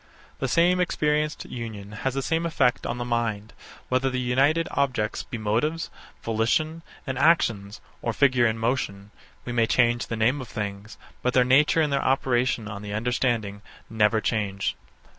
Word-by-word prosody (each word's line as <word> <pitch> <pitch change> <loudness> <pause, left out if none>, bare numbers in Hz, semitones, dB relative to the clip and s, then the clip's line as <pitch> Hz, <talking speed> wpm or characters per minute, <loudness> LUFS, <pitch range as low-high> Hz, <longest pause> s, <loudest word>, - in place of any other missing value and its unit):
The 135 - -1
same 175 +6 +3
experienced 150 -3 0
union 110 -4 -7
has 130 +5 -3
the 135 - -1
same 165 +7 0
effect 130 -6 +1
on 120 - -3
the 120 - -3
mind, 115 -3 -2 0.3
whether 130 +1 +1
the 130 -1 -2
united 135 +6 +2
objects 130 -6 0
be 120 - -7
motives, 120 +10 -1 0.3
volition, 125 +9 0 0.2
and 130 -3 -3
actions; 110 -10 +2 0.2
or 115 - -1
figure 125 0 +3
and 110 0 -2
motion. 105 -4 -2 0.3
We 125 - -4
may 115 -2 +2
change 120 0 +2
the 115 - -3
name 120 +6 +2
of 125 - -8
things; 105 0 -6 0.2
but 125 - 0
their 125 - +6
nature 145 +5 +4
and 150 -2 +1
their 140 - +1
operation 125 -3 +1
on 100 -2 -6
the 105 -1 -6
understanding 110 -3 -1 0.3
never 110 0 +3
change. 100 -4 -1
120 Hz, 165 wpm, -25 LUFS, 110-135 Hz, 0.3 s, their